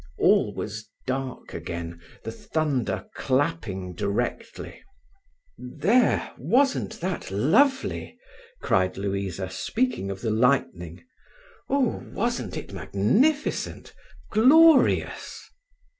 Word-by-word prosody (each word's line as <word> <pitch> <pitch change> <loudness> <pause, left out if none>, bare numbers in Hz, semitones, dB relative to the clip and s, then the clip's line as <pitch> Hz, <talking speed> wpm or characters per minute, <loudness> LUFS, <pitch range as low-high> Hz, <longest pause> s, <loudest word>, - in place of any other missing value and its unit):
All - - +3
was 110 +1 -6 0.2
dark 130 -1 -4
again, 85 0 -6 0.2
the 115 - -5
thunder 145 -1 -2
clapping 130 - -1
directly. 100 +7 -4 0.8
"There, 210 - +1
wasn't 255 -4 +1
that 180 0 -3
lovely!" 260 - +1 0.5
cried 95 0 +1
Louisa, 95 -2 -3
speaking 235 - -1
of 95 -1 -6
the 115 - -1
lightning. 110 - 0 0.7
"Oo, 275 -4 +1 0.2
wasn't 230 - -2
it - - -8
magnificent!—glorious!" 270 - +2
130 Hz, 85 wpm, -25 LUFS, -, 0.8 s, All